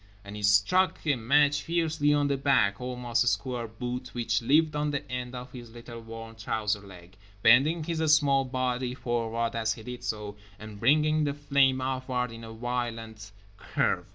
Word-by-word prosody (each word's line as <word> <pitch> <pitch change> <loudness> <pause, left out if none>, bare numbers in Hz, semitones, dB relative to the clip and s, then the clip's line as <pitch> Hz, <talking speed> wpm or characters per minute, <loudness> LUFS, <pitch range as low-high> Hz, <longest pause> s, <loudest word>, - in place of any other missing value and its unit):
_" - - -29 0.2
And 100 +1 -9
he 105 - -6
struck 105 - +3
a 145 -3 +3
match 145 +5 +3
fiercely 160 -3 0
on 145 -1 +2
the 140 - +1
black, 130 -8 +2
almost 125 -1 -1
square 125 -1 -1
boot 125 +3 -6
which 115 -2 0
lived 150 +5 +3
on 150 0 0
the 145 0 -3
end 125 0 -4
of 125 0 -8
his 120 -2 -10
little 115 0 -10
worn 115 0 -9
trouser 105 -1 -2
leg, 90 -2 -14 0.3
bending 140 +8 +5
his 160 -1 0
small 140 -3 +4
body 125 -1 -2
forward 115 -1 -2
as 110 -1 0
he 115 - -11
did 125 +1 -8
so, 105 -3 -4 0.2
and 110 -1 -10
bringing 155 +5 +3
the 140 -1 -2
flame 140 -2 +2
upward 130 -1 -2
in 115 0 -10
a 115 - -8
violent 115 -2 -5 0.3
curve. - - -1
125 Hz, 180 wpm, -28 LUFS, 115-140 Hz, 0.3 s, bending